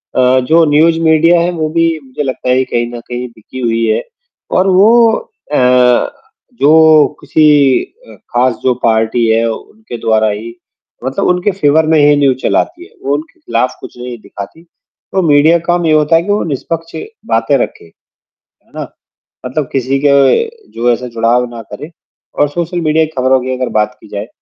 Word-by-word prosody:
अ, 130 0 +3
जो 160 +6 +3
news 165 +2 +3
media 165 +2 +4
है 175 - 0
वो 155 -3 -3
भी 165 +1 +1 0.2
मुझे 130 +3 -5
लगता 130 -1 -4
है 130 +1 +3
कहीं 120 0 -2
न - - -6
कहीं 125 0 -5
बिकी 115 +3 -12
हुई 115 -2 0
है। 110 - 0 0.6
और 185 +1 +2
वो 225 +5 +5 0.4
अ, - - +2 1.0
जो 155 +1 +5
किसी 155 -1 +2 0.6
अ, - - -14
ख़ास 125 0 -1
जो 130 - +2
पार्टी 110 +1 +1
है 115 +1 +2
उनके 215 - -9
द्वारा 110 -1 +1
ही 110 +3 -6 0.5
मतलब 130 +1 -2
उनके 180 +3 +1
फेवर 160 -3 +2
में 160 -1 +3
ही 145 0 +5
न्यूज़ 140 -3 +2
चलाती 345 +2 -1
है, 410 - -20
वो - - -1
उनके 330 +2 -8
खिलाफ 130 - -2
कुछ - - -12
नहीं 125 -1 -7
दिखाती। 100 +14 -10 0.5
तो 190 - 0
मीडिया 150 +3 +4
का 165 - -10
काम 175 -1 -1
ये 160 - +2
होता 155 +1 +3
है 165 - +4
कि 205 - -2
वो 205 - 0
निष्पक्ष 165 +3 -4 0.4
बातें 115 +5 +1
रखे, 120 - -4
है 80 - -27 0.6
ना? - - -5 0.6
मतलब 130 +2 -3
किसी 135 +1 -1
के 145 - +4 0.6
जो 120 +1 0
ऐसा 125 +1 -4
जुड़ाव 115 +2 +1
ना 115 -1 -8
करे, 150 +10 -8 0.4
और 145 - +1
सोशल 175 +3 -3
मीडिया 160 0 +2
की 155 - -7
खबरों 130 +1 +2
की 130 +1 -3
अगर 130 0 -2
बात 105 +4 -1
की - - -16
जाए 100 +1 -6
145 Hz, 185 wpm, -13 LUFS, 120-165 Hz, 1.0 s, वो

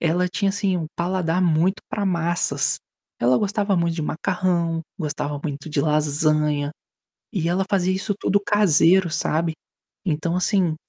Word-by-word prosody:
ela 175 +2 +1
tinha, 195 +2 0
assim, 195 -2 0
um 165 -3 -3
paladar 175 0 0
muito 175 +3 +2
pra 205 - -2
massas. 175 -2 +1 0.4
Ela 125 +1 +4
gostava 205 -1 0
muito 170 -1 +1
de 165 - -3
macarrão, 170 0 -1 0.2
gostava 145 -3 -3
muito 145 0 -5
de 150 - 0
lasanha, 150 0 +1 0.6
e 175 -7 -1
ela 185 +3 +1
fazia 185 -2 +2
isso 200 +2 -2
tudo 200 0 +2
caseiro, 190 -4 +4
sabe. 160 +1 0 0.5
Então, 165 0 0
assim 185 -3 +1
170 Hz, 145 wpm, -23 LUFS, 155-190 Hz, 0.6 s, Ela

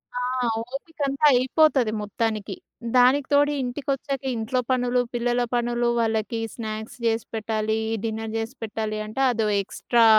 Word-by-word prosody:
ఆ! - - -1 0.5
ఓపిక 310 +3 -8
అంతా 275 +2 +1
అయిపోతది 260 -1 +3
మొత్తానికి. 210 -1 -2 0.4
దానికి 260 +3 +5
తోడు 290 +1 +5
ఇంటికొచ్చాక 270 +1 -3
ఇంట్లో 230 +3 -1
పనులు, 250 -1 +2
పిల్లల 240 +1 +1
పనులు 240 0 +1
వాళ్ళకి 225 0 0 0.2
స్నాక్స్ 220 0 -5
చేసి 225 0 +1
పెట్టాలి 220 0 -1 0.3
డిన్నర్ 220 0 -3
చేసి 225 +4 -4
పెట్టాలి 215 -1 -3
అంటే 220 +5 -3
అదో 225 -2 0
ఎక్స్‌ట్రా 230 +4 +2
235 Hz, 130 wpm, -24 LUFS, 220-255 Hz, 0.5 s, దానికి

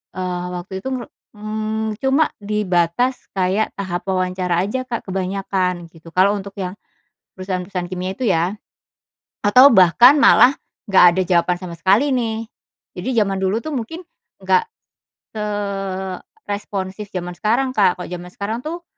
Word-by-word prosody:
eee, 180 -1 -3
waktu 190 +2 -6
itu 265 - -3
ngeru 250 -2 -5 0.3
mmm, 215 0 -3
cuma 275 +4 +2
di 210 +1 -1
batas 180 +9 +1
kayak 190 +3 +1
tahap 185 -1 -4
wawancara 185 -1 0
aja 255 +5 -2
Kak 235 -2 -4
kebanyakan, 185 -2 -2
gitu. 165 0 -15
Kalau 195 +2 +4
untuk 200 0 -8
yang 180 0 -3 0.6
perusahaan-perusahaan 185 -1 -4
kimia 185 +1 -3
itu - - -7
ya, 175 +2 +1 0.9
atau 250 +7 +8
bahkan 230 - +7
malah 270 -1 +6 0.3
gak 190 -2 +7
ada 190 - +2
jawaban 175 0 +2
sama 175 -2 -7
sekali 200 +11 +3
nih. 225 -2 -2 0.5
Jadi - - -4
jaman 195 -2 +2
dulu 195 +4 +1
tuh 310 -2 -5
mungkin 325 +10 -5 0.4
nggak, 455 -1 +3 0.7
seresponsif 200 - -4
jaman 180 -1 -4
sekarang 250 +5 +1
Kak, 195 -3 +3
kalau - - -7
jaman 180 0 -7
sekarang 220 +4 -3
tuh, 340 +2 -5
195 Hz, 140 wpm, -20 LUFS, 185-220 Hz, 0.9 s, atau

